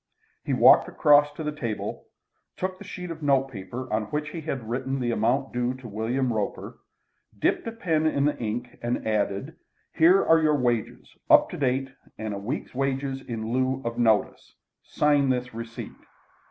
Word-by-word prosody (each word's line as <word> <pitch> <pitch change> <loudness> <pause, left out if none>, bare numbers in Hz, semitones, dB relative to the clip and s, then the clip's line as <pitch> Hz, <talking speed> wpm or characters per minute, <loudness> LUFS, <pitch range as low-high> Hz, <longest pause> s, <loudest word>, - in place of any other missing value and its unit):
He - - -3
walked - - +6
across 145 0 +5
to 160 - -6
the 150 - -2
table, 115 -8 -5 0.5
took 185 0 -3
the - - -9
sheet 180 -2 -7
of 160 -1 -8
notepaper 130 -5 -1
on 110 0 0
which 150 +7 -3
he 165 +1 -6
had 135 -7 -4
written 130 +3 -2
the 120 -2 0
amount 125 +5 0
due 125 +1 -1
to 130 -2 -10
William 120 +4 -1
Roper, 105 -2 -4 0.6
dipped - - 0
a - - -2
pen 165 -9 0
in 140 -2 +1
the 150 - +1
ink, 120 +2 -4
and 120 -1 -2
added: 110 +8 -1 0.4
"Here 180 +4 +5
are 165 0 +5
your 155 -1 +3
wages 120 -4 -1 0.2
up - - +6
to - - -5
date, 135 -1 0 0.3
and 110 -1 -4
a 100 - -4
week's 120 +9 -5
wages 135 0 -2
in 115 -2 -5
lieu 130 +1 0
of 115 0 -3
notice. 110 -3 +1 0.3
Sign 145 -2 +2
this 125 -1 -1
receipt." 115 0 -7
130 Hz, 175 wpm, -26 LUFS, 115-150 Hz, 0.6 s, walked